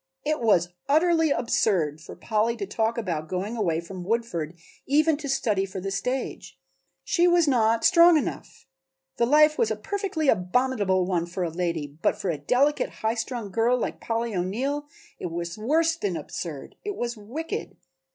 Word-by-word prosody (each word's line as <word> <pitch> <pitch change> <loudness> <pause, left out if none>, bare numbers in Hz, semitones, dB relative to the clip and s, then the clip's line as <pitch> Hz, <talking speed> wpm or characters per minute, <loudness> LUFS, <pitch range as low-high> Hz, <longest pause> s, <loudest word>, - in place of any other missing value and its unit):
It 305 -2 0
was 180 -7 +3 0.2
utterly 325 +1 +4
absurd 190 - +1
for - - -10
Polly 225 +1 0
to 205 - -3
talk 220 +3 -1
about 170 -8 -3
going 195 +5 -3
away 175 -8 0
from 180 +2 -8
Woodford 180 -6 -2 0.3
even 305 +3 +3
to 285 -2 -6
study 215 -7 +1
for 195 0 -5
the 195 +1 -4
stage; 250 +7 -3 0.5
she 350 -1 +3
was 345 -2 +4
not 230 -4 +3
strong 340 -2 +7
enough; 300 - -5 0.5
the 235 - +2
life 305 +3 +5
was 465 - +3
a - - 0
perfectly 395 -7 -2
abominable 195 -2 +2
one 175 -2 -1
for 180 +1 -3
a 170 - -2
lady, 170 -2 -2 0.2
but - - +2
for 185 - -1
a 150 - -4
delicate 280 +4 +2 0.2
high 220 - +3
strung 230 -3 -4
girl 230 +4 +2
like - - -4
Polly 230 0 -2
O'Neill 260 +11 -2 0.3
it - - -3
was 170 +1 -4
worse 320 +9 +2
than 200 - -2
absurd; 150 -1 -7
it 410 -1 -4
was 240 0 -3
wicked! 245 +10 -6
225 Hz, 170 wpm, -26 LUFS, 185-285 Hz, 0.5 s, strong